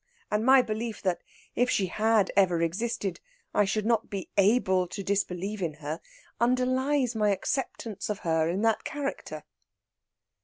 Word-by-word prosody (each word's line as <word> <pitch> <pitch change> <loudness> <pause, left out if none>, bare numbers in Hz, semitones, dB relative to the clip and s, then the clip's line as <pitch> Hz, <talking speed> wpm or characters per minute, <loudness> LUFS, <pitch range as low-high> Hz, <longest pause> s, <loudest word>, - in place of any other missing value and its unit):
And 210 +1 +1
my 260 +1 +6
belief 220 0 -4
that, 185 -3 0 0.3
if 245 +1 +1
she 195 - +2
had 215 +1 +2
ever 185 -4 +4
existed, 195 +1 -2 0.3
I 205 - +4
should 215 +1 -1
not 230 -1 +1
be 195 -2 -5
able 190 -3 +3
to 200 +3 -6
disbelieve 195 +1 -2
in 160 -4 -2
her, 155 +2 -5 0.4
underlies 255 +2 +2
my 210 -2 +2
acceptance 215 0 -2
of 210 - -1
her 160 -1 +2
in 190 +5 -1
that 225 -1 +2
character." 285 -1 -5
210 Hz, 150 wpm, -28 LUFS, 185-235 Hz, 0.4 s, my